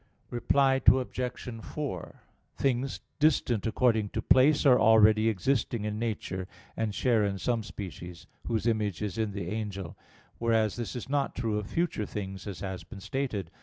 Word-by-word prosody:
Reply 135 +2 +2
Obj. 125 -2 +1
4: 135 - -5 0.4
Things 135 0 0 0.2
distant 130 -8 +2
according 110 -2 +2
to - - -3
place 145 +4 +5
are 125 -3 +7
already 110 0 +6
existing 110 +1 0
in 105 0 -3
nature; 100 -5 -3 0.3
and 110 -2 -2
share 115 -1 +2
in 100 -1 -1
some 115 +3 0
species, 90 -5 -8 0.2
whose 115 -2 -1
image 105 -4 0
is 105 +2 -3
in 110 -2 0
the 100 -3 -4
angel; 100 -5 -4 0.4
whereas 110 -3 +2
this 120 0 -5
is 125 - -5
not 140 0 0
true 110 -3 -1
of 105 - -6
future 165 - -1
things, 95 -1 -6
as 100 -3 -6
has 95 -2 -5
been 105 - -11
stated. 105 -4 -3
110 Hz, 160 wpm, -29 LUFS, 100-125 Hz, 0.4 s, are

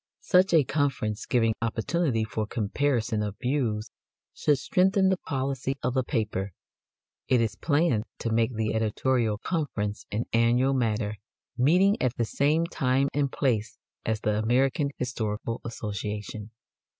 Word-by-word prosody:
Such 185 0 +4
a 160 -3 +6
conference, 125 -6 -1
giving 115 -2 +2
opportunity 115 +2 0
for 110 0 -3
comparison 115 0 0
of 105 -1 -3
views, 120 -5 -1 0.4
should 145 -2 +2
strengthen 190 +7 +3
the 190 - +2
policy 135 -3 -2
of 125 - 0
the 130 -1 +1
paper. 105 - -2 0.7
It 125 - +4
is 115 -2 +1
planned 145 -8 +1
to 115 - -3
make 115 +2 +1
the 110 0 -1
editorial 110 0 +1
conference 110 - -3
an 110 +3 -1
annual 120 +4 +3
matter, 110 -4 0 0.4
meeting 180 - +3
at 125 -1 +1
the 115 - 0
same 150 +8 +1
time 135 -3 +1
and 140 -2 0
place 120 -3 0 0.3
as 110 0 -1
the 105 0 +1
American 130 +6 +2
Historical 115 -2 -3
Association. 105 -1 -5
120 Hz, 140 wpm, -27 LUFS, 110-140 Hz, 0.7 s, a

